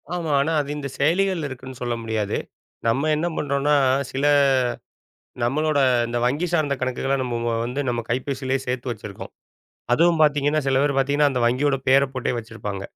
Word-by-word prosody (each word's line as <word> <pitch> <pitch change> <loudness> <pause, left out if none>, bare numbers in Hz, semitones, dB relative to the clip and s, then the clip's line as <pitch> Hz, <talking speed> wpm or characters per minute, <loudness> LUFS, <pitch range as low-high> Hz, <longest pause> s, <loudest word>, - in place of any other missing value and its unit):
ஆமா. 165 -4 -2
ஆனா 155 +4 0
அது 140 - -7
இந்தச் 140 -2 -6
செயலிகள்ல 170 +1 +1
இருக்குன்னு 130 -1 -9
சொல்ல 120 -1 -1
முடியாது. 110 -2 -1 0.5
நம்ம 135 +7 +1
என்ன 160 +3 -1
பண்றோம்னா, 145 +1 +1 0.4
சில 135 +2 -1 1.2
நம்மளோட 150 +4 +1 0.3
இந்த 120 0 -2
வங்கி 145 +8 0
சார்ந்த 155 -4 +1
கணக்குகள 130 +1 -1
நம்ம 125 -2 -3
மு - - -2
வ - - 0
வந்து 125 +4 -3
நம்ம 120 -1 0
கைப்பேசியிலே 130 +2 -1
சேர்த்து 125 0 -3
வச்சிருக்கோம். 105 -3 -7 0.6
அதுவும் 170 +4 +3
பாத்தீங்கன்னா 150 0 +2
சில 135 -1 +2
பேர் 145 -1 +1
பாத்தீங்கன்னா, 145 +2 +3
அந்த 125 - -1
வங்கியோட 135 +4 +2
பேர 135 +1 +6
போட்டே 130 - -1
வச்சிருப்பாங்க. 110 -4 -6
135 Hz, 160 wpm, -23 LUFS, 125-150 Hz, 1.2 s, பேர